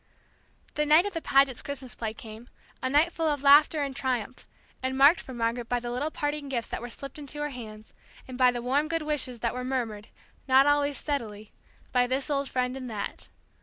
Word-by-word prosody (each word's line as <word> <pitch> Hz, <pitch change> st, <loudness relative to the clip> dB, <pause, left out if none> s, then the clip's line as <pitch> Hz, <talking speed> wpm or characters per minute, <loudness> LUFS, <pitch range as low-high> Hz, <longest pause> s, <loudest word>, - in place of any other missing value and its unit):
The 300 Hz, -, 0 dB
night 310 Hz, +5 st, +6 dB
of 410 Hz, -, -3 dB
the 330 Hz, -, -3 dB
Pagets' 275 Hz, -4 st, +3 dB
Christmas 265 Hz, -3 st, -7 dB
play 220 Hz, -1 st, -5 dB
came, 220 Hz, +2 st, -11 dB, 0.3 s
a 260 Hz, -, -1 dB
night 300 Hz, +5 st, +3 dB
full 325 Hz, -1 st, -1 dB
of 290 Hz, -2 st, -1 dB
laughter 295 Hz, +2 st, +6 dB
and 275 Hz, -2 st, -4 dB
triumph; 255 Hz, -2 st, -3 dB, 0.3 s
and 260 Hz, 0 st, -2 dB
marked 285 Hz, +6 st, +6 dB
for -, -, -10 dB
Margaret 235 Hz, 0 st, -2 dB
by 245 Hz, -, +1 dB
the 240 Hz, 0 st, -5 dB
little 270 Hz, +5 st, -1 dB
parting 290 Hz, -2 st, -3 dB
gifts 240 Hz, -4 st, -2 dB
that -, -, -4 dB
were 240 Hz, -, -6 dB
slipped 275 Hz, +4 st, -8 dB
into 290 Hz, 0 st, -7 dB
her 295 Hz, 0 st, -2 dB
hands, 215 Hz, -4 st, -10 dB, 0.3 s
and 255 Hz, -, -8 dB
by 255 Hz, 0 st, +5 dB
the 240 Hz, -1 st, -5 dB
warm 280 Hz, +5 st, +1 dB
good 330 Hz, -1 st, -1 dB
wishes 265 Hz, -6 st, -3 dB
that 235 Hz, -, 0 dB
were 250 Hz, 0 st, -4 dB
murmured, 235 Hz, -5 st, -3 dB, 0.4 s
not 265 Hz, +1 st, +6 dB
always 290 Hz, -1 st, +2 dB
steadily, 215 Hz, -8 st, -4 dB, 0.4 s
by 250 Hz, -1 st, +3 dB
this 265 Hz, +4 st, -2 dB
old 280 Hz, -1 st, 0 dB
friend 250 Hz, 0 st, -1 dB
and 255 Hz, -2 st, -6 dB
that. 210 Hz, -3 st, -5 dB
260 Hz, 210 wpm, -27 LUFS, 240-290 Hz, 0.4 s, night